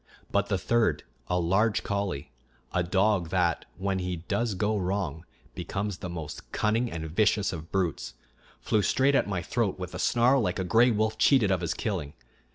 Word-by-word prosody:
But - - +1
the 95 - +1
third, 115 +4 +1 0.2
a 90 - 0
large 95 +6 +2
collie, 95 -9 -3 0.4
a 90 - +2
dog 95 0 +1
that, 85 -3 +1
when 95 0 -1
he 90 -1 -2
does 100 +6 -2
go 105 +3 0
wrong, 90 -5 -2 0.3
becomes 100 -1 -4
the 90 - -5
most 80 -3 -7
cunning 115 +3 0
and 80 -1 -4
vicious 100 +4 +2
of 80 -1 -8
brutes, 80 -10 -2 0.4
flew 105 - +1
straight 130 +8 +2
at 135 - +2
my 90 -3 -2
throat 105 0 -1
with 90 -2 -6
a - - -5
snarl 125 +2 +3
like 90 -5 -1
a 95 - -1
gray 115 +8 +4
wolf 110 -1 0
cheated 120 -8 +4
of 95 -2 +1
his 85 - -2
killing. 85 -10 -3
95 Hz, 180 wpm, -28 LUFS, 85-110 Hz, 0.4 s, gray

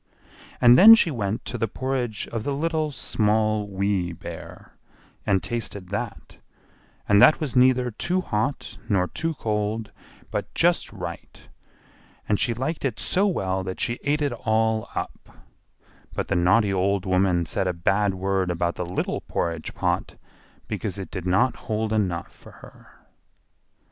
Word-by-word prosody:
And 120 0 +7
then 225 +3 +11
she 175 -7 +2
went 110 -3 -3
to 125 - -4
the 115 - +1
porridge 125 -2 -3
of 115 -2 -4
the 140 +2 -2
Little, 160 +1 0
Small, 110 -4 0
Wee 95 -3 -1
Bear, - - -10 0.5
and 95 -2 +2
tasted 105 -5 -4
that, 100 - -5 0.7
and 100 0 +5
that 155 - +7
was 150 -5 -3
neither 125 -1 +4
too 180 - -1
hot 135 -1 -3
nor 95 -3 +2
too 165 - -3
cold, 105 -1 -2 0.4
but - - -3
just - - +2
right; - - -8 0.8
and 105 - +1
she 115 - +1
liked 150 +7 -3
it 130 -6 -2
so 195 +3 +1
well 95 - -1
that 95 0 -5
she 120 0 -1
ate 150 +2 +1
it 145 - 0
all 110 -1 0
up; - - -6 0.8
but - - -3
the - - +1
naughty 95 +4 +3
old 95 +1 +1
woman 90 -2 +2
said 95 - -1
a - - +2
bad 95 +3 +1
word 95 0 0
about 85 0 0
the 90 - -2
little 90 - -2
porridge 85 -2 -3
pot, - - -1 0.5
because 100 -3 -4
it 95 - -7
did 90 -2 -5
not 100 +7 +2
hold 110 0 -1
enough 90 -6 -1
for - - -16
her. - - -17
105 Hz, 155 wpm, -24 LUFS, 95-125 Hz, 0.8 s, then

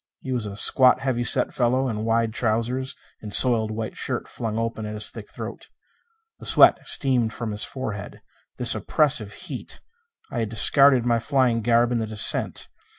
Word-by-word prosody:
He 130 - -6
was 120 -4 -3
a 100 0 -8
squat, 130 +2 +3
heavy 130 -3 -1
set - - +2
fellow 130 +2 0
in 110 -3 -4
wide 115 0 0
trousers 125 +4 -2 0.3
and 105 - -8
soiled 115 -2 +2
white 110 0 -5
shirt - - -4
flung 110 -2 -5
open 115 -1 -3
at 105 - -6
his 105 - -1
thick - - -11
throat. - - -9 0.7
The - - -11
sweat - - +6
streamed 125 -6 0
from 115 -2 -5
his 105 +1 -3
forehead. 105 -6 -6 0.4
This - - +3
oppressive 130 -9 0
heat! - - -8 0.5
I 120 - -3
had 110 -2 -2
discarded 130 +3 +4
my 120 -1 +1
flying 125 -2 0
garb 120 +1 +2
in 120 - 0
the 110 - -3
descent. 105 0 +3
115 Hz, 175 wpm, -23 LUFS, 110-130 Hz, 0.7 s, sweat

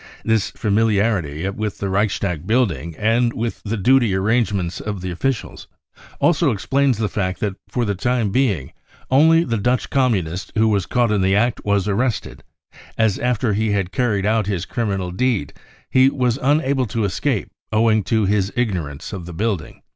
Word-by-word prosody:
This 110 -3 +1
famili 110 0 +1
arity 95 -4 -1
with 105 -1 -4
the 100 - -3
Reichstag 95 -4 -1
building 90 - 0
and 115 +2 +2
with 115 0 -4
the 115 +1 -3
duty 120 -1 +3
arrangements 100 -3 0
of 105 -3 -4
the 90 0 -4
officials 125 +7 -3 0.5
also 170 -2 +3
explains 135 +3 +1
the 110 -1 0
fact 95 -1 -2
that 105 -2 -1 0.2
for 120 -2 -1
the 100 - 0
time 115 +1 0
being 100 - 0 0.4
only 160 +5 +5
the 115 -7 -2
Dutch 125 +2 0
Communist 95 - 0
who 110 0 +3
was 100 -4 0
caught 120 -3 +1
in 105 -2 +2
the 95 +1 +2
act 120 +3 +1
was 100 -1 +1
arrested, 110 +3 -2 0.5
as 110 -3 +2
after 120 -3 0
he 110 +1 0
had 95 -3 -1
carried 105 -4 0
out 110 0 +2
hfs 95 -3 -3
criminal 100 -6 -2
deed 105 - -1 0.4
he 130 +1 +5
was 125 -2 0
unable 140 -2 +1
to 110 +1 -1
escape 90 -4 -1 0.2
owing 110 -1 +3
to 110 -2 +1
his 100 0 +1
ignorance 90 - -3
of 90 -4 -6
the 90 - -7
building. 100 -2 -3
105 Hz, 170 wpm, -20 LUFS, 95-120 Hz, 0.5 s, only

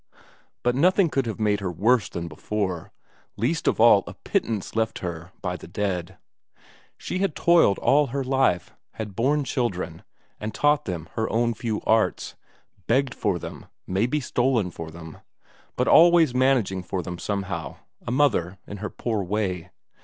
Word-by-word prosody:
But 125 - +2
nothing 180 +6 +3
could 135 -3 0
have 110 - -4
made 105 -1 +2
her 95 -3 -3
worse 110 +4 +2
than 85 0 -5
before; 90 +2 -3 0.5
least 130 +10 -1
of - - +2
all 110 -4 +7
a - - -8
pittance 110 -3 -2
left 110 0 0
her 85 0 -6
by 90 -1 -2
the - - -10
dead. 90 -2 -3 0.8
She 185 - -4
had 195 -5 0
toiled 170 -12 +4
all 145 +1 +3
her 135 +2 -2
life, 130 -9 +1 0.2
had 105 -4 -6
borne 145 +6 +2
children, 100 - -2 0.4
and 105 0 -5
taught 150 0 +2
them 85 -4 -4
her 110 - -1
own 115 +1 +1
few 110 -2 -3
arts; 110 0 +1 0.5
begged 130 +2 +2
for 100 -4 0
them, - - -9 0.2
maybe 115 +11 0
stolen 120 -7 0
for 80 -1 -7
them, 80 -1 -10 0.6
but - - 0
always 170 -5 +6
managing 125 -8 +2
for 90 0 -4
them 90 0 -6
somehow 100 -8 -3 0.3
a - - -7
mother 120 - +1
in 105 - -7
her 105 +2 -4
poor 110 -4 -2
way. 90 -3 -2
110 Hz, 160 wpm, -25 LUFS, 90-130 Hz, 0.8 s, all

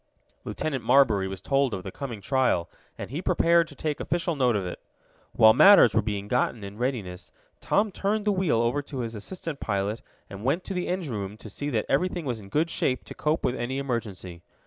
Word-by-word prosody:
Lieutenant 140 -5 -3
Marbury 120 -8 +4
was 95 -1 -6
told 135 -3 +1
of 95 - -7
the 95 - -6
coming 120 -5 -6
trial, 100 -6 +1 0.3
and - - -7
he 150 +5 -3
prepared 170 -2 +3
to 145 - -13
take 150 +1 -3
official 170 -1 -1
note 125 -4 +2
of 100 -3 -1
it. 90 - -6 0.5
While 110 0 +7
matters 195 - +7
were - - +3
being 100 -1 -4
gotten 120 -2 0
in 100 +2 -9
readiness 110 -9 -3 0.3
Tom 205 0 +1
turned 205 +3 -1
the 210 - +3
wheel 180 - +1
over 120 +5 0
to 140 -2 -6
his 115 -1 -4
assistant 150 - -6
pilot 100 +2 -2 0.3
and 100 +1 -9
went 145 +9 0
to 195 - -5
the 180 -1 -2
engine 175 -8 -2
room 100 0 -5
to 110 -1 -11
see 145 +7 -4
that 115 -6 -1
everything 175 +3 0
was 120 -4 -2
in 100 -2 -12
good 160 +8 0
shape 130 -1 -1
to - - -10
cope 155 +2 -1
with 125 - +1
any 125 +2 -3
emergency. 105 -10 -4
125 Hz, 215 wpm, -26 LUFS, 105-155 Hz, 0.5 s, While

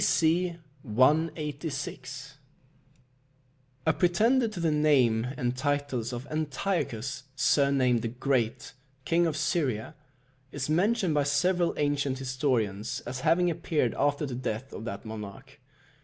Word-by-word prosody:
B.C. 170 +2 +2 0.3
186. 140 +1 -1 1.5
A 160 - +4
pretender 225 +10 +3
to 215 -5 -6
the 165 -2 +1
name 130 -7 +3
and 125 -3 -1
titles 140 -3 -1
of 120 +1 -5
Antiochus, 140 - -2
surnamed 135 -3 +3
the 115 - -2
Great, 125 0 -1 0.3
King 170 +2 +3
of 155 - -2
Syria, 135 - -1 0.6
is 145 +1 -3
mentioned 190 +1 +2
by 145 - +3
several 170 +5 +2
ancient 145 -2 0
historians 125 -6 -1
as 130 +1 -5
having 170 +5 +3
appeared 160 -7 0
after 145 +1 +1
the 135 - -5
death 125 +1 -4
of 110 - -7
that 110 -2 -6
monarch. 110 +5 -8
140 Hz, 120 wpm, -28 LUFS, 125-160 Hz, 1.5 s, A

